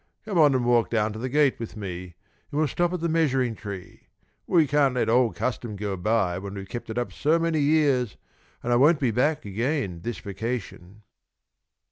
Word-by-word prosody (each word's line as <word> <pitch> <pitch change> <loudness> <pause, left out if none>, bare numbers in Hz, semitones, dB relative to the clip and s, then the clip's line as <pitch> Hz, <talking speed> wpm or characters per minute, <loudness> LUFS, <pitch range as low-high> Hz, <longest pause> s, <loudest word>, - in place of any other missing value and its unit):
"Come 200 -5 0
on 145 -4 +6
and 125 -2 +1
walk 120 -1 +3
down 110 -2 0
to 110 - -7
the 130 +3 -3
gate 145 0 +2
with 115 -1 -7
me, 90 -3 -6 0.3
and 145 - -5
we'll 155 0 +3
stop 175 +4 0
at 180 -2 -3
the 170 - 0
measuring 135 -7 +1
tree. 100 -4 -9 0.4
We 165 -3 +4
can't 145 -2 +2
let 125 - +2
the - - 0
old 120 -1 +3
custom 120 -3 -3
go 100 -1 -3
by 95 -2 0
when 100 +1 -7
we've 95 -1 -7
kept 120 +4 -7
it 110 - -5
up 120 - -2
so 155 +3 +2
many 165 -1 0
years, 140 -6 +2 0.5
and 120 - +1
I - - +4
won't 150 +4 +5
be 130 -5 +1
back 145 +6 +1
again 105 - -2
this 120 +5 -4
vacation." 105 -2 -6
120 Hz, 205 wpm, -25 LUFS, 105-145 Hz, 0.5 s, on